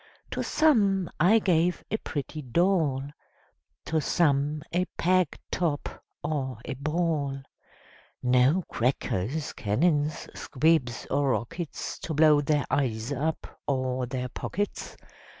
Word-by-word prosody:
To -, -, -2 dB
some 200 Hz, -, +3 dB
I 190 Hz, +7 st, +6 dB
gave 180 Hz, -4 st, +2 dB
a 220 Hz, -, +1 dB
pretty 150 Hz, -4 st, -5 dB
doll, 155 Hz, -1 st, +1 dB, 0.8 s
To 160 Hz, -1 st, 0 dB
some 145 Hz, -1 st, +1 dB
a 180 Hz, +1 st, +2 dB
peg 185 Hz, -2 st, +2 dB
top, 160 Hz, -5 st, -2 dB, 0.2 s
or 140 Hz, -4 st, -2 dB
a -, -, -3 dB
ball; 145 Hz, -1 st, -1 dB, 0.8 s
No 125 Hz, +8 st, +4 dB
crackers, 125 Hz, +3 st, -1 dB
cannons, 145 Hz, +7 st, +1 dB
squibs, 145 Hz, -4 st, +1 dB
or 140 Hz, -1 st, +2 dB
rockets, 155 Hz, +7 st, -4 dB
To 160 Hz, -, -4 dB
blow 150 Hz, -1 st, +6 dB
their 145 Hz, 0 st, +1 dB
eyes 120 Hz, -3 st, 0 dB
up, 155 Hz, +4 st, -3 dB
or 130 Hz, -2 st, 0 dB
their 125 Hz, 0 st, -3 dB
pockets. 205 Hz, +10 st, -4 dB
150 Hz, 115 wpm, -27 LUFS, 130-170 Hz, 0.8 s, I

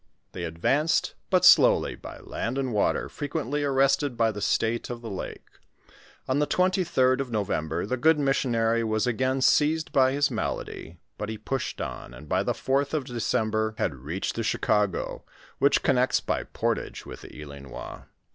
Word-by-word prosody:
They 90 Hz, -, -5 dB
ad 80 Hz, 0 st, -7 dB
vanced 150 Hz, -, +2 dB, 0.2 s
but 185 Hz, -1 st, +3 dB
slowly -, -, +6 dB
by -, -, -10 dB
land 120 Hz, +4 st, -4 dB
and 130 Hz, -3 st, -1 dB
water, 105 Hz, -, +1 dB
frequently 145 Hz, -1 st, -3 dB
arrested 135 Hz, -1 st, +2 dB
by 115 Hz, -1 st, +3 dB
the 105 Hz, -1 st, -7 dB
state 115 Hz, +3 st, 0 dB
of 120 Hz, -1 st, -6 dB
the 115 Hz, -, -6 dB
lake. 95 Hz, -, -6 dB, 0.8 s
On 130 Hz, +2 st, +1 dB
the 150 Hz, -, +1 dB
23d 175 Hz, -9 st, +2 dB
of 135 Hz, -2 st, -3 dB
November, 95 Hz, -7 st, -1 dB
the 130 Hz, +5 st, -2 dB
good 160 Hz, +5 st, +4 dB
missionary 115 Hz, -5 st, +1 dB
was 110 Hz, 0 st, 0 dB
again 130 Hz, +2 st, 0 dB
seized 155 Hz, +4 st, +3 dB
by 130 Hz, -1 st, +4 dB
his 145 Hz, 0 st, +1 dB
malady, 90 Hz, -6 st, -4 dB, 0.2 s
but 105 Hz, -, -3 dB
he 110 Hz, -, -4 dB
pushed 130 Hz, +5 st, -3 dB
on, -, -, -6 dB
and 75 Hz, +5 st, -12 dB
by -, -, +1 dB
the -, -, 0 dB
4th 140 Hz, +3 st, 0 dB
of 150 Hz, -, 0 dB
December, 110 Hz, -2 st, -1 dB
had -, -, 0 dB
reached 75 Hz, +9 st, -4 dB
the 115 Hz, -, -3 dB
Chicago, 105 Hz, -3 st, 0 dB, 0.4 s
which 140 Hz, -, +3 dB
connects 130 Hz, -1 st, +3 dB
by -, -, -2 dB
portage -, -, -3 dB
with -, -, -9 dB
the -, -, -11 dB
Ilinois. 70 Hz, -3 st, -9 dB
125 Hz, 170 wpm, -26 LUFS, 110-140 Hz, 0.8 s, slowly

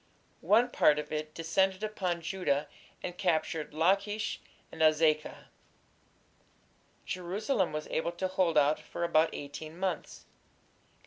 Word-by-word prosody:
One 235 Hz, +4 st, +5 dB
part 150 Hz, -, +4 dB
of 150 Hz, 0 st, -4 dB
it 155 Hz, 0 st, -4 dB
descended 190 Hz, +4 st, +1 dB
upon 185 Hz, -5 st, -2 dB
Judah 165 Hz, -5 st, -1 dB, 0.4 s
and 180 Hz, -, -4 dB
captured 160 Hz, -4 st, 0 dB
Lachish 200 Hz, +7 st, +1 dB, 0.3 s
and 160 Hz, -, -7 dB
Azekah. 155 Hz, -1 st, +2 dB, 1.6 s
Jerusalem 190 Hz, +3 st, -1 dB
was 155 Hz, 0 st, -4 dB
able 170 Hz, +2 st, -1 dB
to 185 Hz, +2 st, -2 dB
hold 185 Hz, -3 st, +1 dB
out 150 Hz, +1 st, +4 dB
for -, -, -6 dB
about 165 Hz, -1 st, +3 dB
eighteen 155 Hz, +3 st, -7 dB
months. 185 Hz, -3 st, -3 dB
170 Hz, 120 wpm, -31 LUFS, 155-190 Hz, 1.6 s, One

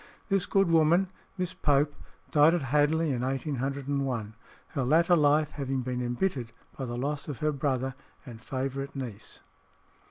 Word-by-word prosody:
This 195 Hz, -2 st, +1 dB
good 195 Hz, -1 st, +3 dB
woman, 165 Hz, +3 st, +4 dB, 0.3 s
Miss 180 Hz, -1 st, -2 dB
Pope, 145 Hz, 0 st, +2 dB, 0.4 s
died 155 Hz, +3 st, +6 dB
at 170 Hz, -, -1 dB
Hadley 150 Hz, +4 st, +2 dB
in 125 Hz, -2 st, -1 dB
1801, 135 Hz, -3 st, -2 dB, 0.4 s
her 140 Hz, -4 st, -2 dB
latter 165 Hz, +7 st, +4 dB
life 150 Hz, -1 st, +3 dB
having 135 Hz, -2 st, -2 dB
been 125 Hz, 0 st, -2 dB
embittered 120 Hz, -1 st, -2 dB, 0.2 s
by 135 Hz, -, -4 dB
the 120 Hz, -1 st, -4 dB
loss 145 Hz, +3 st, -2 dB
of 145 Hz, -5 st, -4 dB
her 155 Hz, +5 st, +1 dB
brother 135 Hz, -2 st, -1 dB, 0.3 s
and 115 Hz, -4 st, -10 dB
favourite 135 Hz, +2 st, -4 dB
niece. 120 Hz, -6 st, -7 dB
140 Hz, 150 wpm, -28 LUFS, 130-155 Hz, 0.4 s, died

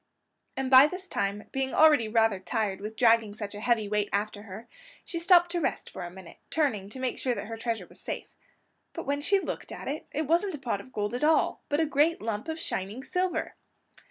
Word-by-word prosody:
And 265 Hz, 0 st, -2 dB
by 265 Hz, +2 st, +9 dB
this 365 Hz, +3 st, -7 dB
time, 200 Hz, -, -2 dB
being 270 Hz, 0 st, -2 dB
already 300 Hz, -8 st, +6 dB
rather 220 Hz, -3 st, +2 dB
tired 200 Hz, -1 st, -2 dB
with 215 Hz, +2 st, -6 dB
dragging 225 Hz, -3 st, +4 dB
such 210 Hz, -2 st, -6 dB
a 205 Hz, -, -7 dB
heavy 225 Hz, -2 st, +1 dB
weight 210 Hz, 0 st, 0 dB
after 205 Hz, +1 st, -1 dB
her, 210 Hz, +2 st, -10 dB, 0.4 s
she 340 Hz, -, -4 dB
stopped 350 Hz, 0 st, +5 dB
to 345 Hz, -1 st, 0 dB
rest -, -, -2 dB
for 190 Hz, -, -7 dB
a 175 Hz, -, -5 dB
minute, 180 Hz, -1 st, -12 dB
turning 235 Hz, -11 st, 0 dB
to 260 Hz, -, -8 dB
make 255 Hz, -1 st, -2 dB
sure 250 Hz, -2 st, 0 dB
that -, -, -5 dB
her 225 Hz, +1 st, -6 dB
treasure 225 Hz, 0 st, -3 dB
was -, -, -16 dB
safe. -, -, -6 dB, 0.6 s
But -, -, -6 dB
when 285 Hz, +1 st, -1 dB
she 395 Hz, +7 st, +3 dB
looked -, -, -5 dB
at -, -, -7 dB
it, 290 Hz, +3 st, -4 dB
it 310 Hz, +2 st, -1 dB
wasn't 340 Hz, +4 st, +1 dB
a -, -, -6 dB
pot 235 Hz, -7 st, -2 dB
of 255 Hz, -, -16 dB
gold 210 Hz, 0 st, -2 dB
at 245 Hz, -, -2 dB
all, 315 Hz, +1 st, +3 dB
but 290 Hz, -, +1 dB
a 325 Hz, -, +3 dB
great 300 Hz, +3 st, +2 dB
lump 215 Hz, +2 st, -3 dB
of 320 Hz, 0 st, -4 dB
shining 205 Hz, +4 st, -4 dB
silver! 360 Hz, 0 st, -1 dB
240 Hz, 225 wpm, -28 LUFS, 210-305 Hz, 0.6 s, by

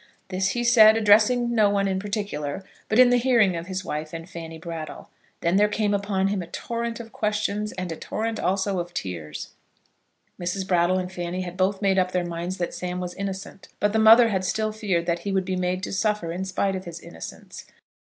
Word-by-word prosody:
This 190 Hz, +1 st, 0 dB
he 240 Hz, -, 0 dB
said, 225 Hz, -2 st, +7 dB
addressing 225 Hz, +3 st, +4 dB
no 215 Hz, -3 st, +4 dB
one 200 Hz, -1 st, +1 dB
in 190 Hz, -1 st, 0 dB
particular, 195 Hz, -6 st, -3 dB, 0.3 s
but 220 Hz, -, +2 dB
in 250 Hz, -1 st, +7 dB
the 245 Hz, -, +4 dB
hearing 235 Hz, -7 st, +3 dB
of 165 Hz, +1 st, -5 dB
his 185 Hz, 0 st, -4 dB
wife 155 Hz, +1 st, -4 dB
and 165 Hz, 0 st, -6 dB
Fanny 165 Hz, -2 st, -8 dB
Brattle. 165 Hz, -1 st, -7 dB, 0.3 s
Then 170 Hz, +3 st, +2 dB
there 210 Hz, +1 st, +5 dB
came 210 Hz, 0 st, 0 dB
upon 195 Hz, -1 st, 0 dB
him 200 Hz, -2 st, -1 dB
a 170 Hz, -, -7 dB
torrent 235 Hz, +4 st, -4 dB
of 225 Hz, -1 st, -9 dB
questions 210 Hz, 0 st, -1 dB
and 185 Hz, -2 st, -4 dB
a -, -, -3 dB
torrent 220 Hz, +7 st, -3 dB
also 190 Hz, 0 st, 0 dB
of 175 Hz, 0 st, -6 dB
tears. 80 Hz, -5 st, -5 dB, 0.9 s
Mrs. 185 Hz, +2 st, -2 dB
Brattle 175 Hz, 0 st, +3 dB
and 185 Hz, 0 st, -3 dB
Fanny 180 Hz, 0 st, -4 dB
had 180 Hz, -1 st, -6 dB
both 190 Hz, +2 st, 0 dB
made 195 Hz, -1 st, +3 dB
up 185 Hz, 0 st, 0 dB
their 180 Hz, -1 st, 0 dB
minds 175 Hz, +2 st, -4 dB
that 175 Hz, -, -3 dB
Sam 180 Hz, 0 st, -4 dB
was 180 Hz, -1 st, -4 dB
innocent; 195 Hz, 0 st, -6 dB
but 205 Hz, 0 st, +1 dB
the 220 Hz, -, +3 dB
mother 225 Hz, +2 st, +8 dB
had 190 Hz, -3 st, 0 dB
still 215 Hz, +3 st, 0 dB
feared 200 Hz, -6 st, -1 dB
that 170 Hz, 0 st, 0 dB
he 200 Hz, +4 st, -4 dB
would 190 Hz, -1 st, +1 dB
be 185 Hz, 0 st, -2 dB
made 180 Hz, 0 st, -1 dB
to -, -, -4 dB
suffer 210 Hz, -4 st, 0 dB
in 185 Hz, +3 st, -3 dB
spite 190 Hz, +1 st, 0 dB
of 185 Hz, 0 st, -6 dB
his 170 Hz, -1 st, -7 dB
innocence. 80 Hz, -, -10 dB
190 Hz, 215 wpm, -25 LUFS, 175-210 Hz, 0.9 s, mother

